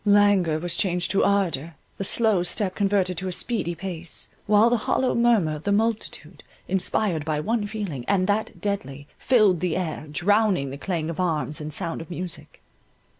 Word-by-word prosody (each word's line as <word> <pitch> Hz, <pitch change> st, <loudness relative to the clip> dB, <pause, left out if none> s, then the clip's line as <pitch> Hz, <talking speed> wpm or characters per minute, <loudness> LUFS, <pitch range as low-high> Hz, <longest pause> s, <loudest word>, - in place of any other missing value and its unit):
Languor 200 Hz, -6 st, +4 dB
was 175 Hz, +2 st, -1 dB
changed 180 Hz, -2 st, +1 dB
to 195 Hz, -, +2 dB
ardour, 170 Hz, -6 st, 0 dB, 0.2 s
the -, -, -1 dB
slow 215 Hz, -1 st, +2 dB
step 185 Hz, +2 st, +1 dB
converted 195 Hz, -4 st, +1 dB
to 190 Hz, -, -4 dB
a -, -, -2 dB
speedy 180 Hz, -3 st, -1 dB
pace, 175 Hz, -2 st, -7 dB, 0.2 s
while 215 Hz, +3 st, +5 dB
the 245 Hz, -, +3 dB
hollow 260 Hz, -, +2 dB
murmur 230 Hz, -9 st, +3 dB
of 150 Hz, -, -9 dB
the 200 Hz, -, 0 dB
multitude, 220 Hz, +2 st, -2 dB, 0.2 s
inspired 190 Hz, -3 st, 0 dB
by 155 Hz, -1 st, -1 dB
one 215 Hz, +5 st, -1 dB
feeling, 200 Hz, -, -5 dB
and 190 Hz, -2 st, +2 dB
that 210 Hz, +2 st, -1 dB
deadly, 145 Hz, -9 st, -3 dB
filled 210 Hz, -9 st, +4 dB
the 175 Hz, -1 st, -1 dB
air, 160 Hz, -4 st, -4 dB
drowning 190 Hz, -4 st, +2 dB
the 140 Hz, -, -6 dB
clang 165 Hz, -2 st, -2 dB
of 165 Hz, -, -8 dB
arms 155 Hz, -5 st, -1 dB
and 150 Hz, 0 st, -5 dB
sound 165 Hz, +1 st, -1 dB
of 165 Hz, -, -10 dB
music. 180 Hz, -1 st, -6 dB
185 Hz, 175 wpm, -24 LUFS, 165-205 Hz, 0.2 s, while